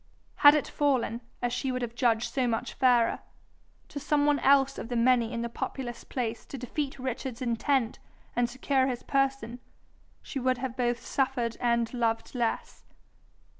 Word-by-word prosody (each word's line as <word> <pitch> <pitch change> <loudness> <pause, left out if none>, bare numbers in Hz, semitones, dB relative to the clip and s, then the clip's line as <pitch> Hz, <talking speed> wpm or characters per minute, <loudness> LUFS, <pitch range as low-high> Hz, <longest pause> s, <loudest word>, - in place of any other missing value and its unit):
Had 290 +1 +8
it 300 - 0
fallen, 255 -5 0 0.2
as 240 0 0
she 260 +1 -1
would 255 -1 -2
have 235 -1 -4
judged 235 -1 +1
so 260 -2 +1
much 235 +1 -2
fairer, 245 -3 +3 0.7
to 285 - -5
some 290 0 +1
one 290 -1 +3
else 275 0 +4
of 225 - -6
the 245 - -2
many 235 -1 +3
in 235 -1 -3
the - - -1
populous 240 +1 -5
place 235 -3 -3
to 275 - -7
defeat 270 +3 -4
Richard's 260 -1 -4
intent 245 0 0 0.4
and 240 0 +2
secure 265 0 +1
his 250 -2 -3
person, 270 -4 0 0.6
she 275 - -5
would 255 0 +1
have 250 -1 -4
both 240 -2 -1
suffered 255 -4 0
and 235 -1 +1
loved 225 -2 -1
less. 235 -3 -2
250 Hz, 170 wpm, -28 LUFS, 235-270 Hz, 0.7 s, Had